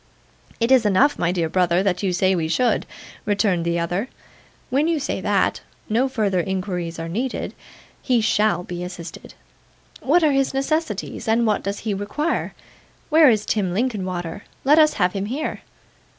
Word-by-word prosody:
'It 230 Hz, +2 st, +1 dB
is 260 Hz, -3 st, +6 dB
enough, 215 Hz, +8 st, +3 dB
my 175 Hz, 0 st, +1 dB
dear 170 Hz, -3 st, 0 dB
brother, 180 Hz, +1 st, +2 dB
that 185 Hz, -3 st, 0 dB
you 195 Hz, -2 st, 0 dB
say 185 Hz, +1 st, +2 dB
we 165 Hz, -3 st, 0 dB
should,' 245 Hz, +9 st, +1 dB, 0.4 s
returned 200 Hz, -4 st, +1 dB
the 170 Hz, 0 st, 0 dB
other. 175 Hz, +7 st, -1 dB, 0.6 s
'When 285 Hz, +5 st, +2 dB
you 330 Hz, -2 st, +1 dB
say 285 Hz, -, -3 dB
that, -, -, +1 dB, 0.3 s
no 245 Hz, +5 st, +2 dB
further 205 Hz, -7 st, 0 dB
inquiries 180 Hz, -2 st, -3 dB
are 165 Hz, 0 st, -5 dB
needed. 240 Hz, +9 st, -3 dB, 0.5 s
He 250 Hz, -3 st, +2 dB
SHALL 215 Hz, -4 st, +2 dB
be 175 Hz, 0 st, -6 dB
assisted. 180 Hz, -1 st, -9 dB, 0.6 s
What 330 Hz, +6 st, +3 dB
are 305 Hz, -, +4 dB
his 275 Hz, -1 st, +1 dB
necessities, 275 Hz, -, -2 dB
and 230 Hz, +1 st, +3 dB
what 215 Hz, -2 st, +1 dB
does 200 Hz, +1 st, -4 dB
he 215 Hz, -2 st, -2 dB
require? 205 Hz, +12 st, -2 dB, 0.5 s
Where 315 Hz, -2 st, +7 dB
is 215 Hz, -3 st, +1 dB
Tim 190 Hz, -5 st, -1 dB
Linkinwater? 185 Hz, -6 st, -2 dB, 0.2 s
Let 295 Hz, +4 st, +5 dB
us 305 Hz, -1 st, +5 dB
have 180 Hz, -3 st, +1 dB
him 200 Hz, 0 st, -3 dB
here. 285 Hz, +7 st, -3 dB
205 Hz, 165 wpm, -22 LUFS, 180-260 Hz, 0.6 s, Where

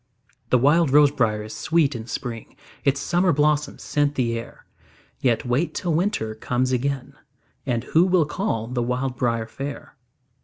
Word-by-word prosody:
The 125 Hz, -, +5 dB
wild 150 Hz, +5 st, +4 dB
rose 145 Hz, +1 st, +6 dB
briar 110 Hz, -6 st, 0 dB
is 110 Hz, -, -8 dB
sweet 155 Hz, -3 st, +1 dB
in 115 Hz, -1 st, -6 dB
spring, 115 Hz, -1 st, -6 dB, 0.3 s
Its 140 Hz, 0 st, +2 dB
summer 175 Hz, +4 st, +2 dB
blossoms 150 Hz, 0 st, +1 dB
scent 145 Hz, 0 st, 0 dB
the 120 Hz, -3 st, 0 dB
air; 115 Hz, -, -8 dB, 0.5 s
Yet 120 Hz, -4 st, +1 dB
wait 125 Hz, +8 st, 0 dB
till 175 Hz, -4 st, -1 dB
winter 160 Hz, -, 0 dB
comes 125 Hz, +3 st, -1 dB
again, 135 Hz, +1 st, -2 dB, 0.5 s
And 120 Hz, -2 st, 0 dB
who 165 Hz, +7 st, +3 dB
will 180 Hz, -4 st, +3 dB
call 145 Hz, -, -2 dB
the 125 Hz, +1 st, -2 dB
wild 125 Hz, +2 st, -1 dB
briar 115 Hz, -2 st, 0 dB
fair? 140 Hz, +5 st, -7 dB
135 Hz, 160 wpm, -23 LUFS, 120-150 Hz, 0.5 s, rose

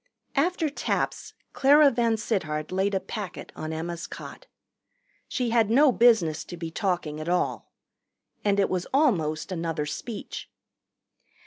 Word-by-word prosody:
After 330 Hz, +3 st, +1 dB
taps 290 Hz, -, -2 dB, 0.2 s
Clara 285 Hz, +1 st, +6 dB
VanSittart 220 Hz, -, -1 dB
laid 195 Hz, +2 st, +1 dB
a -, -, +2 dB
packet 205 Hz, -1 st, -7 dB
on 155 Hz, 0 st, -5 dB
Emma's 170 Hz, +2 st, -4 dB
cot. -, -, -10 dB, 0.8 s
She 245 Hz, -3 st, -1 dB
had 225 Hz, -3 st, +3 dB
no 270 Hz, +4 st, +6 dB
business 225 Hz, -11 st, +4 dB
to 175 Hz, -, -8 dB
be 165 Hz, -1 st, -5 dB
talking 170 Hz, -5 st, -2 dB
at 155 Hz, +2 st, -4 dB
all. 180 Hz, 0 st, -1 dB, 0.7 s
And 200 Hz, -1 st, +2 dB
it 195 Hz, -, +4 dB
was 185 Hz, -1 st, -2 dB
almost 175 Hz, -, +1 dB
another 165 Hz, -3 st, -2 dB
speech. 215 Hz, +8 st, -6 dB
195 Hz, 130 wpm, -26 LUFS, 165-240 Hz, 0.8 s, Clara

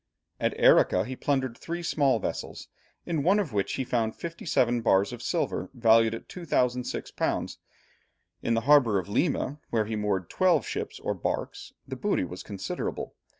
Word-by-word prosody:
At -, -, -1 dB
Arica 90 Hz, +2 st, +5 dB
he 130 Hz, -, -5 dB
plundered 130 Hz, -3 st, -1 dB
three 170 Hz, +5 st, -5 dB
small 140 Hz, -6 st, +2 dB
vessels, 110 Hz, -, -5 dB, 0.4 s
in 160 Hz, -4 st, -1 dB
one 185 Hz, +8 st, +4 dB
of 185 Hz, -, -1 dB
which 100 Hz, -1 st, 0 dB
he 135 Hz, -, -1 dB
found 115 Hz, -3 st, -1 dB
fifty 170 Hz, 0 st, -7 dB
seven 120 Hz, -5 st, +2 dB
bars 100 Hz, -3 st, +3 dB
of -, -, -8 dB
silver -, -, -1 dB
valued 115 Hz, -1 st, +4 dB
at -, -, -10 dB
2006_l._ 125 Hz, -8 st, -1 dB, 0.8 s
In 115 Hz, -, +1 dB
the 115 Hz, -, +1 dB
harbour 130 Hz, -5 st, +5 dB
of 95 Hz, -, -2 dB
Lima, 140 Hz, +4 st, 0 dB
where 110 Hz, -2 st, +1 dB
were 110 Hz, 0 st, -3 dB
moored 100 Hz, -4 st, -1 dB
twelve 180 Hz, -6 st, +2 dB
ships -, -, -4 dB
or -, -, -2 dB
barks, -, -, -4 dB
the -, -, -5 dB
booty -, -, 0 dB
was 90 Hz, +1 st, -6 dB
considerable. 100 Hz, -3 st, -5 dB
120 Hz, 165 wpm, -27 LUFS, 110-145 Hz, 0.8 s, Arica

